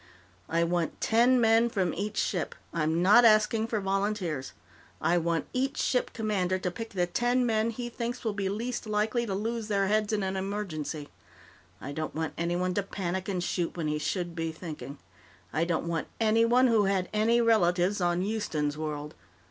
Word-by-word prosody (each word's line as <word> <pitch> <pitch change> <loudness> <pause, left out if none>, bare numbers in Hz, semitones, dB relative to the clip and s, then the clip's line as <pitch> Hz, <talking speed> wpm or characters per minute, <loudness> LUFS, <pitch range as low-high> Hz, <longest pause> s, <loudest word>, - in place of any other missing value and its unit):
"I 170 +1 +2
want 170 -1 -1
ten 240 +3 +4
men 225 0 +4
from 195 -5 0
each 205 +4 -4
ship. 180 -5 -1 0.2
I'm 165 +1 +1
not 210 +6 +7
asking 220 0 +4
for 225 -2 -1
volunteers; 195 -7 -2 0.5
I 175 +1 +2
want 170 -1 0
each 270 +3 -1
ship 250 - 0
commander 195 -5 0
to 185 -1 -2
pick 225 +5 -6
the 180 -3 0
ten 245 +7 +1
men 220 -1 +1
he 240 +1 -4
thinks 240 +1 -4
will 220 -3 -1
be 200 -1 -2
least 235 +3 -3
likely 215 +3 0
to 195 - -2
lose 225 +2 -2
their 200 -2 +1
heads 210 +2 +1
in 210 -2 0
an 190 0 -2
emergency. 185 -7 -4 0.7
I 140 - -6
don't 155 +2 -4
want 160 0 -2
anyone 175 +2 -1
to 205 - +1
panic 190 -1 -4
and 180 -3 -1
shoot 175 -1 -2
when 160 -3 -1
he 150 0 -1
should 175 +2 -2
be 165 -1 -2
thinking. 155 -3 -8 0.6
I 165 - +1
don't 170 -1 -1
want 165 -2 -2
anyone 230 +3 +4
who 225 -4 +4
had 190 -2 +1
any 225 +3 +3
relatives 190 -4 +3
on 175 0 +1
Houston's 155 -8 -2
World. 150 -1 -4
195 Hz, 180 wpm, -28 LUFS, 170-225 Hz, 0.7 s, not